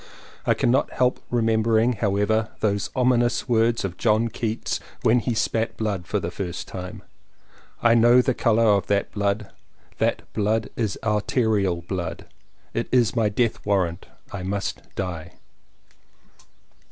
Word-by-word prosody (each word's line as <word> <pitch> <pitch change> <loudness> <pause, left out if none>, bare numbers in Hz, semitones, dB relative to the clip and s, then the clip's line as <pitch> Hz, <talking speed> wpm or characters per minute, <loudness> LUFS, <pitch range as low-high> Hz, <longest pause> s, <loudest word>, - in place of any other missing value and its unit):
I - - +4
cannot 125 +3 +1
help 125 -1 +1
remembering, 115 0 +2
however, 105 +1 +1
those 100 -2 0
ominous 125 -2 +2
words 115 -2 +2
of 90 -2 -5
John 115 0 +2
Keats 110 0 -3 0.2
when 120 +2 +4
he 120 0 -2
spat 115 +1 -1
blood 100 -5 -2
for 105 - 0
the 85 -2 -4
first 90 -1 -5
time 90 -1 -7 0.8
"I 120 -1 +6
know 120 +2 +6
the 130 +1 +2
colour 115 -1 +2
of 100 -3 +3
that 100 -1 0
blood; 100 0 -1 0.5
that - - +1
blood 110 +1 0
is 110 -4 -1
arterial 105 -4 +1
blood; 85 -2 -4 0.5
it 115 - -2
is 120 -3 +3
my 110 -3 +2
death 115 +2 0
warrant; 95 -4 0 0.2
I 100 - -5
must 95 -1 -3
die!" 90 -2 -5
110 Hz, 140 wpm, -24 LUFS, 100-115 Hz, 0.8 s, I